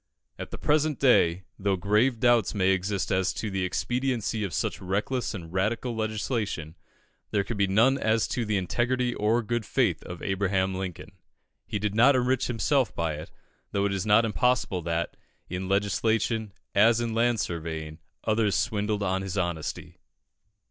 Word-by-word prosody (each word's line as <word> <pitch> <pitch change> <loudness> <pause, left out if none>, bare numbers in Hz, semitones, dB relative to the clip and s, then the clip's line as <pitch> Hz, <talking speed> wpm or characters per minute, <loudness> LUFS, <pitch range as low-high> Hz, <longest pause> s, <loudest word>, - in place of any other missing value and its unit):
At - - -6
the - - -7
present 150 -1 +1
day, 95 -9 +4 0.2
though 100 0 +1
grave 105 +6 +2
doubts 120 -3 +3
may 95 -2 +2
exist 95 +1 -1
as 95 0 +2
to 110 - -4
the 95 -1 -1
expediency 120 +1 -1
of 100 - -3
such - - -2
reckless 105 +4 -1
and 85 -3 -8
radical 115 +5 -1
legislation, 110 - -2 0.5
there 100 - +1
can 115 +4 -4
be 100 -1 +2
none 115 +8 +3
as 110 -1 +2
to 120 - -1
the 105 -2 0
integrity 120 +6 0
or 115 +3 +1
good 120 +1 -1
faith - - +1
of 90 - -9
Abraham 95 -1 0
Lincoln. 95 +2 -5 0.6
He - - -2
did 105 0 -2
not 120 +6 +5
enrich 130 0 +1
himself 125 0 +1
by 85 -2 -1
it, 75 +1 -7 0.4
though 100 0 +1
it 100 - 0
is 100 +1 -2
not 110 +2 +5
impossible 115 -4 +1
that, 85 0 -2 0.4
in 95 +1 -3
legislation 110 +2 0 0.2
as 115 +3 +5
in 115 -1 -2
land 115 0 +2
surveying, 80 -3 -4 0.2
others 110 -2 +1
swindled 105 -2 0
on 95 -1 0
his 95 0 -4
honesty. 85 -4 -3
105 Hz, 165 wpm, -27 LUFS, 95-115 Hz, 0.6 s, not